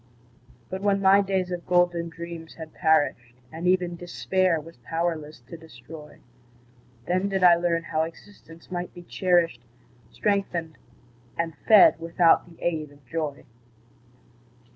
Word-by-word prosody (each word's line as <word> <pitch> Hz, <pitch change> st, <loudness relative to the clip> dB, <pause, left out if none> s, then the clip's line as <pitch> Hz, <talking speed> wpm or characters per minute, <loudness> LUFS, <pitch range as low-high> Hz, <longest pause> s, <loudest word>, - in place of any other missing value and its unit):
But 190 Hz, +1 st, -4 dB
when 200 Hz, -1 st, +2 dB
my 195 Hz, +1 st, +5 dB
days 190 Hz, -2 st, -1 dB
of 175 Hz, -1 st, -5 dB
golden 175 Hz, -1 st, +2 dB
dreams 165 Hz, 0 st, -9 dB
had 160 Hz, -1 st, -10 dB
perished, 145 Hz, -7 st, +1 dB, 0.2 s
And 165 Hz, +3 st, -4 dB
even 180 Hz, -1 st, +1 dB
Despair 175 Hz, 0 st, 0 dB
was 165 Hz, 0 st, -13 dB
powerless 155 Hz, +1 st, -4 dB
to 130 Hz, +8 st, -11 dB
destroy, 150 Hz, 0 st, -13 dB, 0.8 s
Then 185 Hz, +3 st, 0 dB
did 190 Hz, -1 st, -1 dB
I 175 Hz, -1 st, +8 dB
learn 170 Hz, -1 st, 0 dB
how 155 Hz, 0 st, -1 dB
existence 165 Hz, +1 st, -10 dB
might 175 Hz, 0 st, -5 dB
be 175 Hz, -, -10 dB
cherished, 175 Hz, -8 st, +1 dB, 0.5 s
Strengthened 180 Hz, -6 st, -2 dB, 0.6 s
and 165 Hz, -1 st, -2 dB
fed 210 Hz, -6 st, +7 dB
without 165 Hz, +1 st, +3 dB
the 165 Hz, -, -17 dB
aid 155 Hz, -4 st, -2 dB
of 145 Hz, -2 st, -21 dB
joy. 150 Hz, 0 st, -4 dB
170 Hz, 135 wpm, -25 LUFS, 160-180 Hz, 0.8 s, I